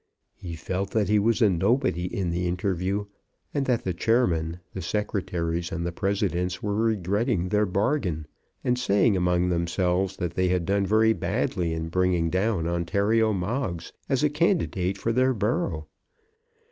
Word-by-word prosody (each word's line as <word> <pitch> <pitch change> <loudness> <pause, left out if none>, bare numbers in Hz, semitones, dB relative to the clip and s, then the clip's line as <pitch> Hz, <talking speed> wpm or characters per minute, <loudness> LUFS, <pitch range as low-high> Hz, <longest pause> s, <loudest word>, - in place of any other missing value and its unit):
He 85 -2 -7
felt 95 +4 -3
that 105 -4 +1
he 105 0 +4
was 115 +3 +2
a 105 - +6
nobody 95 - +1
in 90 -1 -2
the 90 +1 -1
interview, 95 +2 -1 0.5
and 140 -2 -1
that 125 -3 +1
the 95 - -1
chairmen, 85 -5 +1
the 95 - -5
secretaries, 85 -3 -2
and 85 -1 -3
the 85 - -1
presidents 90 -1 -1
were 105 -1 -1
regretting 105 -2 0
their 105 +1 +2
bargain, 95 - 0 0.4
and 125 0 +1
saying 105 -2 +3
among 90 0 +2
themselves 90 +2 0
that 90 -3 -3
they 95 +1 +1
had 90 -1 +1
done 100 +1 +1
very 110 +2 +4
badly 85 -5 -1
in 80 0 -3
bringing 90 -2 +1
down 95 -2 0
Ontario 100 +6 +1
Moggs 95 -2 -3 0.2
as 135 +1 +1
a 150 - +4
candidate 150 - +1
for 115 - -1
their 130 +1 +2
borough. 100 -7 -1
95 Hz, 160 wpm, -26 LUFS, 85-110 Hz, 0.5 s, a